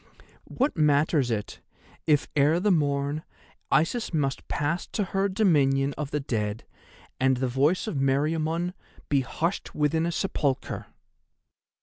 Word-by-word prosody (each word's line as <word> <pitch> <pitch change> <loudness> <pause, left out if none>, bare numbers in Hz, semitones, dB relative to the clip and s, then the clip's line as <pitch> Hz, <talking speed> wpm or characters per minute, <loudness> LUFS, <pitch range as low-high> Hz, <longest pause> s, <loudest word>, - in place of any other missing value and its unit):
What 275 +4 0
matters 150 -3 +3
it, 105 -3 -3 0.5
if 150 -2 +3
ere 150 +4 +4
the 205 +2 +2
morn 145 -1 0 0.5
Isis 165 - +1
must 140 -5 -1
pass 150 +4 -1
to 210 - -1
her 195 +1 0
dominion 145 -9 +2
of 150 -2 -4
the 150 - -1
Dead, 110 -5 -3 0.5
and 130 0 +3
the 130 +1 0
voice 140 +8 +2
of 215 -10 -3
Meriamun 155 +5 0 0.4
be 140 -2 +3
hushed 165 +7 -3
within 160 +2 +1
a - - -1
sepulchre? 145 -6 -2
150 Hz, 130 wpm, -26 LUFS, 135-170 Hz, 0.5 s, ere